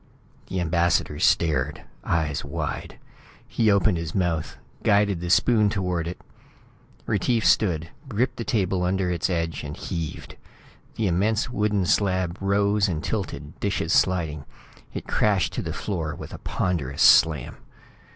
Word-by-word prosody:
The 95 - -3
ambassador 85 0 +1
stared, 75 -7 +1 0.2
eyes 80 -4 -1
wide. 75 +2 -5 0.5
He 110 -2 +1
opened 100 -3 +3
his 80 -2 -5
mouth, 85 -5 -1 0.2
guided 100 -4 +2
the 90 - -4
spoon 105 +3 +4
toward 90 -5 -1
it 90 - -6 0.9
Retief 110 +2 0
stood, 85 -5 +2 0.2
gripped 125 +3 0
the 115 - -3
table 95 -5 0
under 90 0 0
its 85 +1 -1
edge 85 -2 -2
and 75 0 -6
heaved. 85 -3 -5 0.6
The 110 - -1
immense 105 +7 +1
wooden 105 -4 +1
slab 95 -2 +1
rose 100 +1 +2
and 85 -4 -3
tilted, 75 -8 -4
dishes - - -1
sliding. 80 -6 +1 0.5
It - - -6
crashed 100 -4 +1
to - - -2
the - - -4
floor 80 -6 -3
with - - -9
a - - -8
ponderous 75 -7 -1
slam. 75 -6 +5
90 Hz, 140 wpm, -24 LUFS, 80-100 Hz, 0.9 s, slam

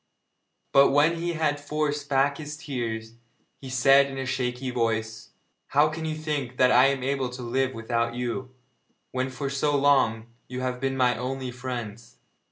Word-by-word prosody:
But 140 0 +6
when 150 +4 +3
he 170 +1 -2
had 155 -2 0
forced 145 -1 -2
back 140 +1 +2
his 150 -1 -6
tears, 115 -7 -4 0.5
he 135 - -8
said 135 +2 +5
in 135 -1 -7
a 135 - -3
shaky 125 0 -2
voice: 110 -2 -2 0.4
'How 145 +2 +4
can 160 +1 -5
you 155 -1 -2
think 145 -5 -3
that 125 0 +5
I 125 +2 +6
am 135 -2 -1
able 135 -1 -1
to 125 0 -8
live 130 +2 -1
without 115 +1 -1
you, 125 +1 -3 0.6
when 130 0 -1
for 135 +2 -4
so 140 +1 +1
long 135 -6 +3 0.2
you 125 0 -5
have 125 -1 -2
been 135 0 -1
my 125 -1 +3
only 130 +2 -4
friends? 120 -2 -7
130 Hz, 175 wpm, -26 LUFS, 125-140 Hz, 0.6 s, But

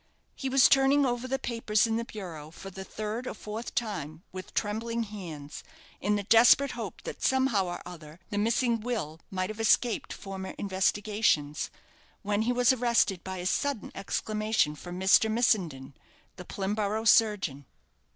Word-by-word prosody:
He 270 - -4
was 265 0 +6
turning 275 +1 +4
over 245 0 -1
the 270 +1 0
papers 230 -4 +1
in 225 -1 0
the 230 - -1
bureau 175 -10 -8
for 195 +4 -10
the 190 +1 -7
third 215 +5 -5
or - - -4
fourth 215 +3 -7
time, 170 -8 -3
with 185 0 -9
trembling 230 +2 -1
hands, 170 -9 -8 0.4
in 210 +1 +1
the 205 - -1
desperate 235 +6 +6
hope - - -7
that - - -7
somehow 260 -7 +2
or 175 - -5
other 165 -2 -11
the 205 - -1
missing 230 +2 +1
will 215 -10 -4
might 185 +1 -2
have 215 - -10
escaped 225 +1 +2
former 190 -1 -7
investigations, 195 -5 0 0.5
when 205 +1 0
he 230 +3 +1
was 245 +1 +4
arrested 235 -7 +1
by 190 0 -5
a 180 - -5
sudden 280 +4 -1
exclamation 215 -5 0
from 175 +4 -8
Mr. 195 +3 +5
Missenden, 180 - +1 0.4
the 180 - -10
Plimborough 210 +3 -2
surgeon. 200 - +3
210 Hz, 160 wpm, -29 LUFS, 185-230 Hz, 0.5 s, was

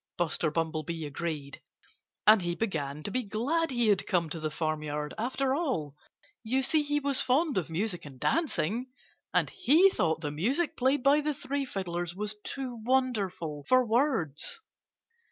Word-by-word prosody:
Buster 165 -2 0
Bumblebee 160 0 -2
agreed. 145 -2 -5 0.6
And 215 -1 +7
he 175 -1 -1
began 155 -9 -3
to 205 - -3
be 255 - 0
glad 255 +10 0
he 240 -4 +2
had 200 -2 +2
come 170 -5 +1
to 165 - -3
the 155 0 -2
farmyard, 150 -1 -3
after 260 +3 0
all. 255 - -1 0.5
You 260 +4 +1
see, 310 +3 +3
he 295 0 0
was 280 -2 0
fond 285 +4 +2
of 175 -3 -1
music 175 +1 -1
and 135 -3 -11
dancing. 250 - 0 0.4
And - - +2
he 370 +1 +5
thought 160 - 0
the 150 -3 -2
music 250 - 0
played 260 +1 +2
by 285 +2 +5
the 300 0 -1
three 280 +1 -2
fiddlers 175 -6 -4
was 210 +2 -3
too 255 -4 -5
wonderful 205 - 0
for 255 0 +5
words. 220 - 0
210 Hz, 160 wpm, -29 LUFS, 160-265 Hz, 0.6 s, And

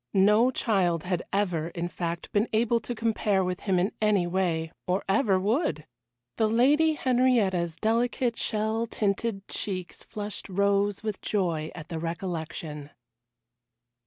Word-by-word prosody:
No 210 +5 +5
child 190 -10 +1
had 180 -1 -1
ever, 180 -6 0
in 170 0 -4
fact, 170 -1 -4
been 210 +3 +2
able 235 +1 +3
to 240 +2 -5
compare 215 -3 +1
with 180 0 -2
him 190 -3 0
in 185 +4 +1
any 210 -4 +3
way, 175 -3 -1 0.2
or 185 +2 0
ever 195 -1 +3
would! 215 - 0 0.5
The 220 -1 +2
Lady 290 +8 +4
Henrietta's 240 - +2
delicate 235 +3 0
shell 220 +2 -1
tinted 200 -1 -1
cheeks 185 -3 -4
flushed 210 -1 -6
rose 200 +1 +1
with 215 -3 -3
joy 170 -6 -1
at 165 -1 -9
the 165 -2 -4
recollection. 160 -3 -5
200 Hz, 135 wpm, -27 LUFS, 175-225 Hz, 0.5 s, No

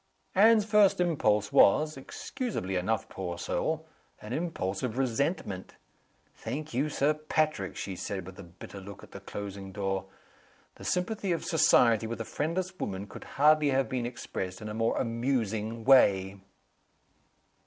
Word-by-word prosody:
Anne's 215 +2 +6
first 210 -4 +4
impulse 110 - +2
was 155 +9 +5
(excusably 135 - -4
enough, 100 +5 0
poor 90 -2 -5
soul) 160 - -2 0.3
an 105 +3 -7
impulse 100 - -2
of 125 -2 -3
resentment. 130 - -1 0.6
"Thank 150 +2 -6
you, 140 +5 +1
Sir 145 +1 +2
Patrick!" 155 - -1
she 95 - -5
said, 95 0 -4
with 95 0 -11
a - - -7
bitter 90 +3 -11
look 100 +1 -10
at - - -14
the - - -8
closing 100 -1 -7
door. 95 0 -2 0.7
"The - - -12
sympathy 190 +2 -1
of 170 - -1
society 120 - +4
with 115 +1 -5
a 115 - -3
friendless 180 - -3
woman 95 0 -3
could - - -11
hardly 150 +1 +5
have 135 0 +1
been 125 -2 -1
expressed 95 -6 -5
in 105 - -6
a - - -5
more 115 +1 0
amusing 115 -2 -1
way!" 100 -7 +5
120 Hz, 150 wpm, -29 LUFS, 100-155 Hz, 0.7 s, Anne's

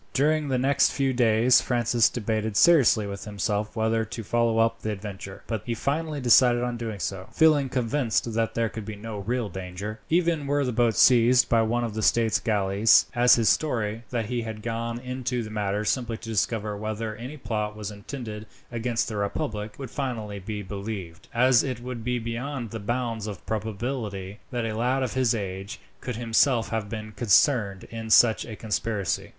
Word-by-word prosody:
During 150 +2 +2
the 130 -2 0
next 135 +3 +3
few 135 -1 0
days 120 0 +4
Francis 120 -1 +2
debated 110 -2 -2
seriously 135 -10 +5
with 100 0 -6
himself 105 +1 -2
whether 110 0 +1
to 115 +1 -6
follow 115 +1 +1
up 115 0 +2
the 110 - -3
adventure; 100 -2 -7
but 110 -3 -3
he 120 - -3
finally 150 +5 -2
decided 120 -1 +5
on 120 -1 -2
doing 115 -3 -5
so, 95 +2 -4
feeling 150 -4 +4
convinced 125 -2 0
that 115 0 -1
there 115 0 +1
could 110 0 -7
be 110 +1 -6
no 105 0 -7
real 120 +3 -2
danger, 95 +3 -6
even 165 -3 +1
were 145 0 +1
the 125 - -1
boat 120 -2 +2
seized 125 0 +5
by 115 -1 +4
one 120 +2 0
of 115 -3 -3
the 110 - -3
state 115 0 +2
galleys; 105 -1 +4
as 120 +1 +6
his 115 -2 +1
story, 115 -3 0
that 115 -3 -2
he 120 +2 -2
had 110 -2 -7
gone 115 0 -3
into 125 -1 -3
the 110 - -8
matter 105 0 -1
simply 115 +1 -1
to 115 - -10
discover 105 -1 -1
whether 110 +1 -4
any 125 +7 -8
plot 105 -5 -3
was 105 -1 -5
intended 105 0 -7 0.2
against 120 0 -1
the 110 - -4
republic, 105 +1 -3
would 135 -3 -7
finally 110 -7 -4
be 105 +2 -5
believed, 100 -4 -7
as 125 +1 +4
it 130 -4 -3
would 120 -1 -6
be 125 +1 0
beyond 120 +1 -4
the 115 - -5
bounds 115 0 -2
of 100 -3 -7
probability 105 -2 -4
that 120 -3 -2
a 110 -1 -3
lad 125 +4 +1
of 125 - -3
his 125 -3 +2
age 100 +1 -5 0.2
could 125 - -5
himself 115 +1 +2
have 110 -2 -3
been 110 -1 -6
concerned 105 -2 +2
in 115 -1 -6
such 110 0 +5
a 110 - -7
conspiracy. 105 -2 -2
115 Hz, 190 wpm, -26 LUFS, 105-125 Hz, 0.2 s, as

